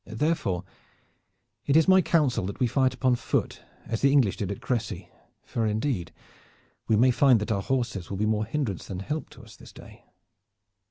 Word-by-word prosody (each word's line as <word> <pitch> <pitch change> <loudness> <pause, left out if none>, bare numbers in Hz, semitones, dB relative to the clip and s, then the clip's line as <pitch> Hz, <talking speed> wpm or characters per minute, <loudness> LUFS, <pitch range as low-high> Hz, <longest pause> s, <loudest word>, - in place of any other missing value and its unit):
Therefore, 110 - -1 1.0
it 140 - +2
is 160 - +4
my 190 0 +6
council 150 - +1
that 100 - -7
we 125 - +3
fight 130 +2 +2
upon 130 -2 +2
foot, - - -2 0.2
as 115 - -3
the 140 - +4
English 115 -10 +3
did 100 -1 -3
at 100 - -5
Crecy, 105 -7 -3 0.3
for 115 - -3
indeed 105 - -2 0.8
we 110 - +3
may 125 +4 +4
find 125 -2 +4
that 105 +2 -3
our 100 -2 0
horses 120 -8 -2
will 100 - -4
be 105 - 0
more 110 0 0
hindrance 115 - -3
than 95 -1 -5
help 150 +10 -4
to - - -15
us - - -14
this - - -14
day." - - -15
115 Hz, 185 wpm, -26 LUFS, 100-135 Hz, 1.0 s, my